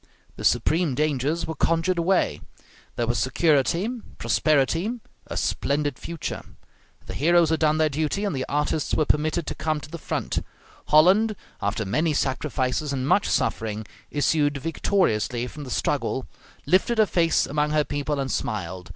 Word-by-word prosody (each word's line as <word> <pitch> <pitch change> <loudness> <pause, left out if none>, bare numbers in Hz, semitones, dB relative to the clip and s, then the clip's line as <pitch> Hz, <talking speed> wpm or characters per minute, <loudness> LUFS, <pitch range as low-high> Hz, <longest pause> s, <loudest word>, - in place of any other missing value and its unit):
The - - -8
supreme 160 -4 +2
dangers 150 +2 0
were 160 - -4
conjured 165 +2 +1
away; 180 +3 +1 0.5
there 120 - 0
was 120 +1 0
security, 155 +6 +2 0.3
prosperity, 165 - +1 0.3
a - - -5
splendid 145 -1 -1
future; 170 -2 -5 0.6
the - - -7
heroes 170 +2 +3
had 160 - +1
done 155 -1 +3
their 155 0 +3
duty, 155 +7 -1
and 200 - -1
the 130 -1 -3
artists 150 +1 0
were 155 - +2
permitted 155 +3 +1
to - - -3
come 155 -1 -1
to 150 - -12
the 170 - -6
front; - - -2 0.4
Holland, 195 +8 +5 0.3
after 100 +1 -1
many 155 - +1
sacrifices, 135 +1 -1
and 130 -1 -2
much 200 - +3
suffering, 110 -1 -1 0.2
issued 145 0 +1
victoriously 130 - 0
from 145 +4 -8
the - - -8
struggle, 130 0 -1 0.4
lifted 185 - +2
her 215 - +6
face 170 -4 +2
among 150 +1 0
her 150 0 +2
people 145 0 -2
and 135 -1 -2
smiled. 95 -7 -3
150 Hz, 155 wpm, -24 LUFS, 135-165 Hz, 0.6 s, her